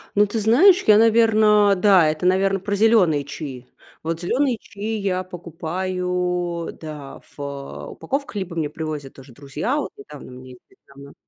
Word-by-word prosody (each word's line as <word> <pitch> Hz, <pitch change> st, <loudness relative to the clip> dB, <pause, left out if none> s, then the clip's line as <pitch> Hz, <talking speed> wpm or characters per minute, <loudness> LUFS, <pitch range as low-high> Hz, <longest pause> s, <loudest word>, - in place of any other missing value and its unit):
Ну, 205 Hz, -, +5 dB
ты 210 Hz, +2 st, -3 dB
знаешь, 300 Hz, -, +5 dB
я, 210 Hz, -1 st, +7 dB
наверно, 215 Hz, -2 st, +4 dB
да, 185 Hz, -4 st, +5 dB
это, 155 Hz, +3 st, -3 dB
наверно, 195 Hz, +1 st, +2 dB
про 205 Hz, +2 st, -3 dB
зелёные 200 Hz, -9 st, +3 dB
чаи. 135 Hz, -3 st, -8 dB, 0.4 s
Вот 165 Hz, +1 st, -3 dB
зелёные 255 Hz, +6 st, 0 dB
чаи 215 Hz, +3 st, -5 dB
я 185 Hz, -2 st, -1 dB
покупаю, 180 Hz, 0 st, -3 dB
да, 150 Hz, -3 st, -9 dB
в, -, -, -14 dB
а, 140 Hz, -1 st, -7 dB
упаковках, 275 Hz, -3 st, -5 dB
либо 190 Hz, -4 st, -4 dB
мне 155 Hz, -3 st, -2 dB
привозят 150 Hz, -3 st, -6 dB
тоже 135 Hz, 0 st, -15 dB
друзья. 145 Hz, -, -3 dB
Вот 295 Hz, -, -3 dB
и -, -, -11 dB
там 150 Hz, -1 st, -12 dB
мне 130 Hz, 0 st, -12 dB
недавно 140 Hz, 0 st, -16 dB
180 Hz, 160 wpm, -21 LUFS, 150-210 Hz, 0.4 s, я